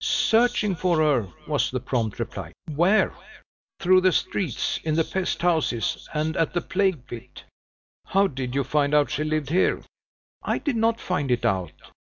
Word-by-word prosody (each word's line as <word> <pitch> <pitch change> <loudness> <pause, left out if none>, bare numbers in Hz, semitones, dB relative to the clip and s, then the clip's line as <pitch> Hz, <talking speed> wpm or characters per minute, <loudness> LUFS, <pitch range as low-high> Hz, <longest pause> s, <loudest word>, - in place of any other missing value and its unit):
"Searching 220 -4 +2
for 175 0 +1
her," 145 -9 +2 0.2
was - - 0
the - - -2
prompt 115 -4 -2
reply. - - -5 0.2
"Where?" 180 +8 +3 0.7
"Through 185 0 +5
the 185 0 +4
streets; 165 - -1
in 155 -1 0
the 165 - +3
pest 185 0 -3
houses, 160 -9 0
and 155 +1 -1
at 165 - +1
the 175 - +1
plague 185 -9 0
pit." 120 -3 -10 0.6
"How 195 +1 +3
did 130 -6 -4
you 140 - +2
find 145 +2 +1
out 145 -1 +3
she 150 - -1
lived 155 -2 -2
here?" 185 +3 +2 0.6
"I - - -1
did 285 -5 -2
not 230 +1 +1
find 145 -7 -2
it 125 -1 +1
out. 90 -4 0
160 Hz, 170 wpm, -24 LUFS, 135-185 Hz, 0.7 s, Through